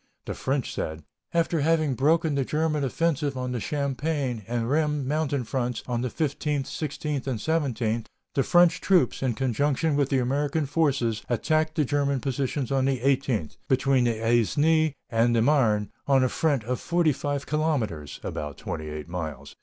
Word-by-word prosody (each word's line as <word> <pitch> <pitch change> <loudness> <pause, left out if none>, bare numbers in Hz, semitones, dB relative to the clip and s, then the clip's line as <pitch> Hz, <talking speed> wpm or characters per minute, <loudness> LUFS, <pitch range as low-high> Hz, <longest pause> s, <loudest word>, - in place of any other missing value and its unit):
The - - -3
French 135 -1 -2
said: 80 0 -4 0.3
"After 170 -1 +1
having 155 -1 +2
broken 155 +4 +2
the 140 -1 +1
German 155 +1 0
offensive 145 0 0
on 125 0 -3
the 125 - -2
Champagne 140 -2 -2
and 120 -1 -1
Rheims 150 0 +1
mountain 145 -1 0
fronts 125 -1 -2
on 120 -1 -2
the 125 - -1
15th, 150 0 -1
16th, 150 -2 -4
and 130 -4 -1
17th, 120 -6 -1 0.3
the 135 - +2
French 175 +4 +4
troops, 180 -10 +2
in 130 -4 0
conjunction 140 +5 +1
with 140 -1 +1
the 135 - +2
American 140 +4 0
forces, 135 -7 +1
attacked 155 +6 +1
the 155 -4 +2
German 140 0 +1
positions 135 0 -2
on 135 -1 +2
the 135 -2 +1
18th, 130 - 0
between 130 -1 +3
the 115 -2 0
Aisne 145 - +2 0.2
and 115 +1 +3
the 115 - +3
Marne 115 -7 +2 0.2
on 135 -2 +4
a 130 - +2
front 145 -6 +1
of 125 +3 -2
forty 170 -3 +2
five 140 +1 -3
kilometres 130 - -1
[about 75 -2 -5
twenty 80 -1 -5
eight 75 0 -6
miles]. 80 -5 -6
135 Hz, 170 wpm, -26 LUFS, 120-150 Hz, 0.3 s, French